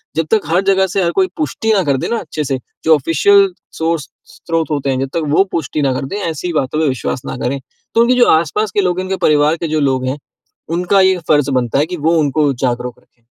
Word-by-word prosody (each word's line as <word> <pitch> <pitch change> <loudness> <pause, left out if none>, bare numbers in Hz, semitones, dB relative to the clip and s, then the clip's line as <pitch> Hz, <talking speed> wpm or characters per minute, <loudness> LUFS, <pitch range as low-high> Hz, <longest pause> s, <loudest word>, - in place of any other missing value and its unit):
जब 160 - 0
तक 220 -2 +4
हर 170 +4 +2
जगह 190 -1 +3
से 190 +1 -1
हर 170 - +1
कोई 375 - +2
पुष्टि 270 -7 -1
ना 195 -3 +2
कर 140 -4 +1
दे - - -3
ना, 235 - 0
अच्छे 155 -2 -5
से, 135 -2 -1 0.3
जो 160 0 +5
ऑफिसियल 190 +7 +3 0.2
सोर्स 160 -3 -1 0.2
स्रोत 165 -1 -3
होते 140 -2 -1
हैं, 130 -1 0
जब 135 0 -2
तक 165 - -1
वो 195 - +5
पुष्टि 155 -2 -2
ना 135 -2 +1
कर 130 - -3
दें, 195 - -5
ऐसी 165 +3 -4
बातों 150 0 -1
पे 160 - +2
विश्वास 130 -1 -3
ना - - -5
करें। 135 +3 -1 0.4
तो 230 - +5
उनके 245 +2 +4
जो 245 -1 +4
आस-पास 170 +6 +1
के 205 - +1
लोग 180 -1 0
है, 185 - -3
उनके 190 0 -2
परिवार 150 +1 +3
के 165 - -3
जो 155 0 0
लोग 130 -3 0
हैं, 130 +3 -2 0.5
उनका 180 +4 +2
ये 190 0 +4
फर्ज 145 -2 +3
बनता 120 +2 -1
है 145 - +2
कि 180 +2 -6
वो 160 +2 +1
उनको 145 0 +1
जागरूक 125 -1 -3
रखें। 120 -2 -35
160 Hz, 250 wpm, -16 LUFS, 140-185 Hz, 0.5 s, जो